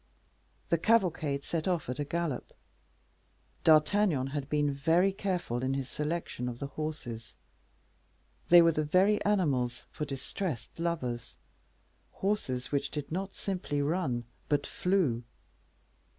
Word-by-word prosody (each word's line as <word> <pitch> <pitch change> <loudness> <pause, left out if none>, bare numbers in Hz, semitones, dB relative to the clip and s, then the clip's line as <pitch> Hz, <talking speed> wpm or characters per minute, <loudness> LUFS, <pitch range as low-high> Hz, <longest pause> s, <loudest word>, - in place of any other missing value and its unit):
The 170 - +3
cavalcade 165 -9 +2
set 165 0 -2
off 175 -4 0
at 125 +2 -4
a - - +1
gallop. 165 -2 -3 1.1
D'Artagnan 155 -3 +4
had 145 -2 -3
been 145 -1 +2
very 165 +7 +3
careful 180 - -2
in 130 +1 0
his 135 -2 -2
selection 150 -5 -3
of 120 - -6
the 140 - -4
horses; 140 -6 -5 1.1
they 175 0 +9
were 165 - +5
the 155 -1 0
very 190 +7 +3
animals 140 -12 +1
for 150 - -3
distressed 140 - -5
lovers 125 -9 -2 0.8
horses 160 -11 -1
which 140 -1 0
did 150 -1 -5
not 195 +3 -3
simply 180 -7 -2
run, 145 -5 0 0.3
but 145 -1 +2
flew. 175 -11 +1
150 Hz, 125 wpm, -31 LUFS, 135-180 Hz, 1.1 s, they